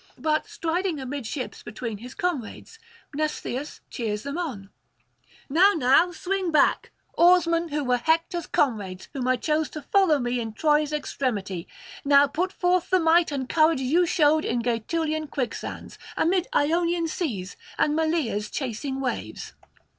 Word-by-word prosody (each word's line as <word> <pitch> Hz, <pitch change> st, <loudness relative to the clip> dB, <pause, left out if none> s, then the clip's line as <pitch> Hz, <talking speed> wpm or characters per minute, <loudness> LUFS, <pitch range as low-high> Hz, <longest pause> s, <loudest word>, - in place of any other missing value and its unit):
But 310 Hz, +4 st, 0 dB
striding 355 Hz, -4 st, -2 dB
amidships 265 Hz, -1 st, -5 dB
between 215 Hz, -1 st, -6 dB
his 250 Hz, +3 st, -10 dB
comrades, 360 Hz, -, -4 dB, 0.3 s
Mnestheus 300 Hz, -2 st, -3 dB
cheers 215 Hz, -4 st, -3 dB
them 280 Hz, +1 st, -4 dB
on: 250 Hz, -, -5 dB, 0.8 s
'Now, 365 Hz, +8 st, +5 dB
now 310 Hz, +5 st, +4 dB
swing 370 Hz, +1 st, -2 dB
back, 300 Hz, -2 st, +3 dB, 0.3 s
oarsmen 340 Hz, -1 st, +4 dB
who 295 Hz, -1 st, -2 dB
were 250 Hz, -1 st, +2 dB
Hector's 330 Hz, +5 st, 0 dB
comrades, 205 Hz, -9 st, -1 dB
whom 255 Hz, -2 st, -3 dB
I 255 Hz, -, +4 dB
chose 305 Hz, +4 st, 0 dB
to 305 Hz, -, -7 dB
follow 380 Hz, -7 st, +3 dB
me 245 Hz, -1 st, -1 dB
in 225 Hz, -2 st, -4 dB
Troy's 300 Hz, +3 st, +2 dB
extremity; 210 Hz, -, -3 dB, 0.4 s
now 280 Hz, 0 st, +6 dB
put 340 Hz, +7 st, -2 dB
forth 360 Hz, -1 st, +1 dB
the 370 Hz, -, +4 dB
might 330 Hz, 0 st, +4 dB
and 270 Hz, -3 st, -3 dB
courage 315 Hz, -1 st, +3 dB
you 330 Hz, +7 st, +2 dB
showed 310 Hz, -1 st, +3 dB
in 235 Hz, 0 st, -1 dB
Gaetulian 310 Hz, +7 st, -1 dB
quicksands, 255 Hz, -5 st, -5 dB, 0.2 s
amid 360 Hz, +2 st, +2 dB
Ionian 335 Hz, -1 st, +1 dB
seas 230 Hz, -, -4 dB, 0.2 s
and 300 Hz, -, +2 dB
Malea's 310 Hz, -11 st, 0 dB
chasing 265 Hz, +1 st, -4 dB
waves. 255 Hz, -2 st, -4 dB
300 Hz, 140 wpm, -25 LUFS, 250-335 Hz, 0.8 s, now